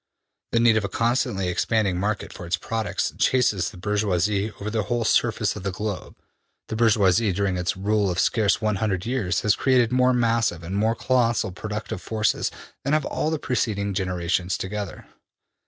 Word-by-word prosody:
'' - - -58
``The - - +5
need 115 -1 +5
of 110 - 0
a 100 - -2
constantly 115 -5 0
expanding 95 0 +1
market 105 +2 -2
for 85 - -8
its 85 - 0
products 115 -2 -2
chases 115 -8 +2
the - - -13
bourgeoisie 105 +1 0
over 105 +2 -4
the 110 -1 0
whole 120 +1 -1
surface - - +2
of - - -6
the 100 - -2
globe.'' 105 +1 -5 0.5
``The - - -3
bourgeoisie, 110 -3 +3
during 95 0 0
its 90 0 -1
rule 105 +1 +1
of 90 - -2
scarce 105 -1 +2
one 105 -2 0
hundred 95 -2 -1
years, 115 -7 0
has 105 -1 +3
created 125 -3 +3
more 125 0 +4
massive 115 -7 +1
and 90 +4 -5
more 110 +3 +2
colossal 120 -5 +1
productive 105 +3 -5
forces 110 -1 0 0.3
than 140 - 0
have 155 -2 +2
all 160 +1 -1
preceding 105 -7 -1
generations 90 -1 -1
together.'' 105 +1 -5
105 Hz, 175 wpm, -24 LUFS, 95-115 Hz, 0.5 s, ``The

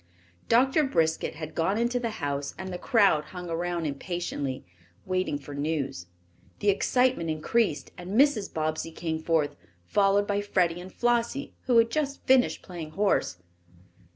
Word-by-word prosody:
Doctor 265 +6 +4
Briskett 160 - 0
had 155 0 -7
gone 180 +5 +1
into 240 +2 +1
the 235 -1 -2
house 140 0 -3
and 190 -1 -6
the 180 - -5
crowd 200 - +3
hung 180 0 -7
around 170 0 -2
impatiently, 145 -3 -3 0.4
waiting 185 -5 0
for 145 0 -10
news. 140 - -2 0.5
The 205 - +1
excitement 250 -2 +2
increased, 155 0 0
and 185 +6 -1
Mrs. 270 -8 +3
Bobbsey 155 +1 -2
came 160 -1 -3
forth, 160 -3 +1 0.3
followed 200 - +3
by 205 0 0
Freddie 175 -4 +1
and 185 +1 -10
Flossie, 240 +3 0
who 245 -2 +4
had 230 0 +5
just 280 0 -2
finished 260 -1 +3
playing 170 -4 -7
horse. 190 - +1
180 Hz, 150 wpm, -27 LUFS, 155-230 Hz, 0.5 s, had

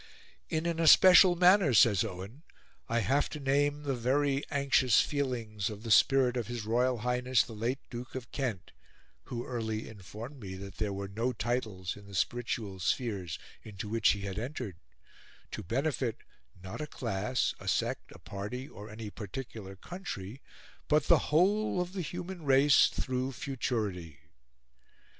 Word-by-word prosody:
"In 160 0 -1
an 170 -1 -1
especial 180 +2 +8
manner," 180 - +5
says 105 -1 +6
Owen, 100 +6 -7 0.5
"I 115 +1 +1
have 135 +8 +1
to 150 - -6
name 145 +1 +1
the 140 -2 -1
very 135 +3 +1
anxious 135 -4 +3
feelings 115 -8 -1
of 105 0 -8
the 115 - -4
spirit 130 +2 +5
of 120 -4 -2
his 120 -3 -5
Royal 125 +3 +2
Highness 125 -1 +2
the 115 - -10
Late 115 +5 -1
Duke 125 +1 -7
of 125 -2 -6
Kent 120 -9 -3 0.5
(who 120 -1 -5
early 110 -3 -3
informed 110 +6 -9
me 95 -4 -7
that 100 +1 -9
there 105 -2 -1
were 100 0 -4
no 115 +6 -2
titles 110 -8 -2
in 100 -1 -14
the 100 - -9
spititual 105 -2 -2
spheres 100 - -1 0.2
into 105 -1 -8
which 115 0 +2
he 100 - -6
had 100 0 -4
entered), 120 - -5 0.7
to - - -5
benefit, 130 - -1 0.5
not 95 +10 -6
a 150 - -4
class, 120 -2 -1
a - - -10
sect, - - -1
a - - -12
party, 105 +7 -6
or 105 -5 -11
any 110 -1 -7
particular 105 -1 -7
country, 125 - -7 0.5
but 150 -1 +3
the - - +5
whole 190 +6 +2
of 180 +1 -3
the 190 - -3
human 175 +3 -6
race, 135 0 +6
through 130 0 -2
futurity." 105 - -3
120 Hz, 155 wpm, -31 LUFS, 105-140 Hz, 0.7 s, especial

